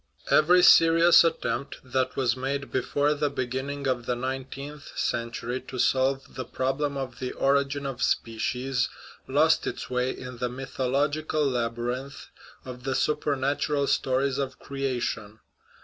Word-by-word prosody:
Every 180 Hz, +4 st, +6 dB
serious 165 Hz, 0 st, +7 dB
attempt 155 Hz, -4 st, -1 dB
that 130 Hz, 0 st, -1 dB
was 125 Hz, -3 st, +1 dB
made 140 Hz, +2 st, -3 dB
before 145 Hz, +3 st, +1 dB
the 150 Hz, 0 st, 0 dB
be 130 Hz, -2 st, -2 dB
ginning 140 Hz, +3 st, -4 dB
of 125 Hz, -3 st, -1 dB
the 125 Hz, -, +1 dB
nineteenth 135 Hz, +3 st, -6 dB
century 120 Hz, +1 st, -2 dB
to 130 Hz, -, -6 dB
solve 135 Hz, +2 st, +1 dB
the 130 Hz, -, -4 dB
problem 135 Hz, +3 st, -2 dB
of 130 Hz, -3 st, -5 dB
the 130 Hz, -1 st, -4 dB
origin 140 Hz, +1 st, +1 dB
of 135 Hz, -3 st, -4 dB
species 125 Hz, +3 st, 0 dB, 0.4 s
lost -, -, +3 dB
its -, -, -5 dB
way 125 Hz, 0 st, +1 dB
in 125 Hz, -2 st, -7 dB
the 125 Hz, 0 st, -1 dB
mythological 140 Hz, +4 st, -1 dB
labyrinth 120 Hz, +1 st, -3 dB, 0.4 s
of 125 Hz, -1 st, -8 dB
the 135 Hz, 0 st, -1 dB
supernatural 145 Hz, -1 st, 0 dB
stories 135 Hz, +1 st, +1 dB
of 135 Hz, -1 st, -3 dB
creation. 125 Hz, -6 st, -3 dB
135 Hz, 135 wpm, -27 LUFS, 125-140 Hz, 0.4 s, serious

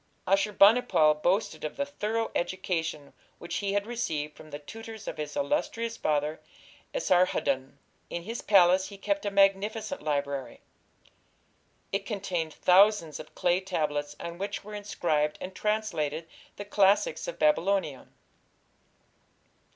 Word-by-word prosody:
Ashur 195 Hz, +2 st, +2 dB
bani 205 Hz, +5 st, +6 dB
pal 155 Hz, -9 st, +4 dB
boasted 165 Hz, +1 st, 0 dB
of 155 Hz, -, -4 dB
the 280 Hz, -, 0 dB
thorough 225 Hz, -5 st, -2 dB
education 165 Hz, -5 st, -2 dB, 0.2 s
which 170 Hz, -, -5 dB
he 200 Hz, -1 st, -1 dB
had 205 Hz, 0 st, 0 dB
received 160 Hz, -11 st, -3 dB
from 155 Hz, -, -13 dB
the 145 Hz, -, -6 dB
tutors 220 Hz, +7 st, -10 dB
of -, -, -4 dB
his 150 Hz, -1 st, -5 dB
illustrious 230 Hz, -5 st, -1 dB
father, 150 Hz, -2 st, -1 dB, 0.5 s
Esarhaddon. 175 Hz, -, +1 dB, 0.3 s
In 170 Hz, -, -4 dB
his 230 Hz, +5 st, -5 dB
palace 185 Hz, -1 st, +5 dB
he 200 Hz, 0 st, -10 dB
kept 300 Hz, +4 st, -1 dB
a -, -, +2 dB
magnificent 200 Hz, +6 st, +1 dB
library. 140 Hz, -4 st, -2 dB, 1.3 s
It 195 Hz, 0 st, -2 dB
contained 180 Hz, -7 st, -3 dB
thousands 185 Hz, -4 st, +4 dB
of 155 Hz, -, -11 dB
clay 175 Hz, 0 st, +2 dB
tablets 150 Hz, -6 st, -2 dB
on 170 Hz, +1 st, -7 dB
which 200 Hz, +1 st, -4 dB
were 210 Hz, +1 st, -10 dB
inscribed 165 Hz, -7 st, -1 dB
and 185 Hz, -, -7 dB
translated 170 Hz, -8 st, -1 dB, 0.3 s
the 205 Hz, -, -7 dB
classics 205 Hz, -, +2 dB
of -, -, -5 dB
Babylonia. 195 Hz, -, +1 dB
190 Hz, 135 wpm, -28 LUFS, 155-210 Hz, 1.3 s, bani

